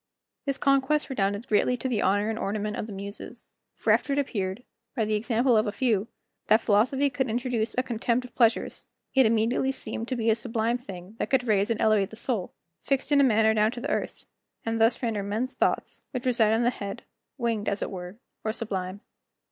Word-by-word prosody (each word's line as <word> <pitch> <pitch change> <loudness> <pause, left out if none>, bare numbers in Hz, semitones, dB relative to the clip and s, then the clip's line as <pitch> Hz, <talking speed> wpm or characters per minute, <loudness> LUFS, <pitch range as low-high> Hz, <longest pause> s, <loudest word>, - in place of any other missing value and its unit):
This 275 -1 0
conquest 275 +2 +2
redounded 205 -2 -1
greatly 245 +4 +2
to 260 - -3
the 235 -5 0
honor 205 +2 +2
and 220 - -4
ornament 210 +1 -2
of - - -4
the - - -8
Muses; 200 +1 -8 0.2
for - - +3
after 280 - +1
it - - -1
appeared, 205 -6 -2 0.3
by 225 - +1
the 215 - -1
example 235 +3 +2
of 215 +1 +3
a - - 0
few, 220 -3 +1 0.4
that 220 - +6
philosophy 245 +8 +3
could 265 -3 -1
introduce 235 -1 -1
a 255 - +3
contempt 240 +1 -1
of 250 - -13
pleasures, 230 -2 +1 0.3
it 265 -4 +6
immediately 230 +4 +2
seemed 230 -3 -5
to 255 - -2
be 225 -1 +2
a - - +3
sublime 230 0 0
thing 195 -3 -10
that - - -1
could 260 -2 +2
raise 205 -1 +2
and 230 - 0
elevate 215 -3 +3
the - - -10
soul, 225 -5 -2 0.3
fixed 275 +1 -1
in 285 -1 +6
a - - +6
manner 220 -3 +4
down 215 0 +3
to 245 - -6
the 280 - -3
earth, - - -3 0.4
and 225 0 -1
thus 225 +3 +3
render 220 -3 0
men's 220 +6 -2
thoughts, - - -1
which 255 -1 -5
reside 230 -4 +3
in 225 +2 +2
the 240 - +3
head, 200 0 -6 0.3
winged 230 -4 0
as 200 - -1
it - - -4
were, 180 +1 -7 0.3
or 220 - 0
sublime. 195 -4 -4
225 Hz, 210 wpm, -27 LUFS, 210-250 Hz, 0.4 s, that